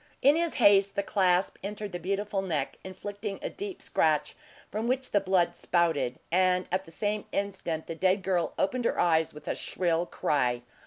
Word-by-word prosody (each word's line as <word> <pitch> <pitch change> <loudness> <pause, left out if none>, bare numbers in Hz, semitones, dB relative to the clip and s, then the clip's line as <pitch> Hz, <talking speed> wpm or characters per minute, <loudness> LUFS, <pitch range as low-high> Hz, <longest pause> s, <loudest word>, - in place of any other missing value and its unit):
In 280 +2 +7
his 335 0 0
haste, 200 -3 +5
the 200 - 0
clasp 185 -2 +2
entered 205 0 -5
the 175 - -4
beautiful 200 +3 -1
neck, 155 -8 -2
inflicting 205 +2 -6
a - - -3
deep 390 0 -7
scratch, - - +1 0.4
from 220 +2 -2
which 260 +1 0
the 205 - +3
blood 185 -2 +2
spouted; 165 -9 +1
and 185 +1 +3
at 190 +1 0
the 165 - -14
same 210 +4 -2
instant 190 -5 -2
the - - -5
dead 185 +4 +1
girl 180 -3 0
opened 245 +5 0
her - - +1
eyes 160 -2 +3
with 150 - -13
a - - 0
shrill 175 -1 -1
cry. 125 -4 0
190 Hz, 180 wpm, -29 LUFS, 170-205 Hz, 0.4 s, In